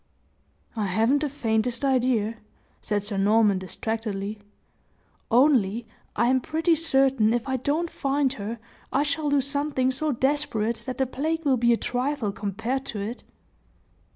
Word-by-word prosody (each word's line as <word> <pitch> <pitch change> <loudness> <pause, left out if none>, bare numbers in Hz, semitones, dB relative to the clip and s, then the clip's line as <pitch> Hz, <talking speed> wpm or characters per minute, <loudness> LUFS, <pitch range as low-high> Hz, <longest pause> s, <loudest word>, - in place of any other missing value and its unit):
"I 215 -2 -1
haven't 225 +9 +2
the 295 0 -1
faintest 240 -1 -1
idea," 240 -4 +1 0.4
said 205 -1 -1
Sir 205 -1 -3
Norman, 205 0 +3
distractedly; 210 +1 -4 0.9
"only 240 -4 +3 0.3
I 235 - +2
am 260 +1 +3
pretty 320 +5 +1
certain, 270 -8 +3
if 240 +3 -3
I 265 0 0
don't 295 +7 0
find 275 -1 0
her, 225 -1 -5 0.3
I 280 - +2
shall 295 0 0
do 285 -1 +3
something 280 -1 0
so 300 +4 -1
desperate 235 -4 0
that 255 -1 -4
the 265 - +2
plague 315 +5 -2
will 270 -3 +3
be 235 0 +3
a 235 - +4
trifle 250 -3 -1
compared 225 +7 -3
to 210 - -4
it!" 215 +5 -5
250 Hz, 150 wpm, -25 LUFS, 220-280 Hz, 0.9 s, a